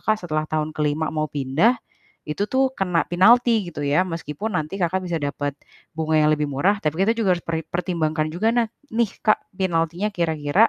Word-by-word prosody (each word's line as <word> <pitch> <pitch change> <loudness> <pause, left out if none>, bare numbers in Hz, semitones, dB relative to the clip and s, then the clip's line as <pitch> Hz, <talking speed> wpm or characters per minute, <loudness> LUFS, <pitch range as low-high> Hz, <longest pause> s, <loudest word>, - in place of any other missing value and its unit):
Kakak 215 - +1
setelah 155 -1 -1
tahun 155 0 -1
ke-5 150 +1 0
mau 155 -1 -1
pindah, 145 - +2 0.5
itu 175 +7 -1
tuh 265 +2 +2
kena 180 -6 +1
pinalti 225 +3 +4
gitu 155 - -7
ya. 145 +4 +3
Meskipun 165 +5 -4
nanti 155 +4 -3
Kakak 180 +2 +1
bisa 175 -2 -2
dapet 145 0 -2 0.4
bunga 160 0 +1
yang 150 0 +4
lebih 150 -1 -1
murah, 185 +10 +2
tapi 155 +3 -1
kita 225 - +3
juga 195 -6 +2
harus - - -16
peri 165 -1 -1
pertimbangkan 160 -3 -1
juga 190 +7 +1
na 240 -1 +3 0.3
nih, 230 0 +2 0.2
Kak, 215 - +4 0.2
pinaltinya 175 +1 0
kira-kira 165 +3 +2
165 Hz, 185 wpm, -23 LUFS, 155-200 Hz, 0.5 s, pinalti